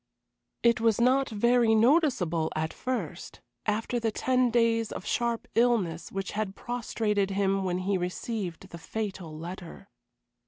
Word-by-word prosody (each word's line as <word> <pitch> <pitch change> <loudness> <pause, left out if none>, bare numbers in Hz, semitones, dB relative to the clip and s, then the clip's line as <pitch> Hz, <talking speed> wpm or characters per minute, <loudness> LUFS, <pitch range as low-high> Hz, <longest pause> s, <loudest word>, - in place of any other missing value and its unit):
It 235 -1 +4
was 225 -1 +3
not 260 +3 +3
very 235 +1 +3
noticeable 220 - +3
at 160 +1 -2
first, 255 -1 -4 0.3
after 225 +3 0
the 225 -1 0
ten 255 +2 +2
days 230 -1 +2
of - - -6
sharp 235 -1 -1
illness 225 -9 +1
which 195 0 -3
had 205 -2 -3
prostrated 220 -4 -1
him 195 0 +1
when 180 -1 0
he 190 +1 0
received 180 0 -4
the 170 - -9
fatal 190 -5 -5
letter. 175 +1 -8
215 Hz, 140 wpm, -28 LUFS, 185-235 Hz, 0.3 s, It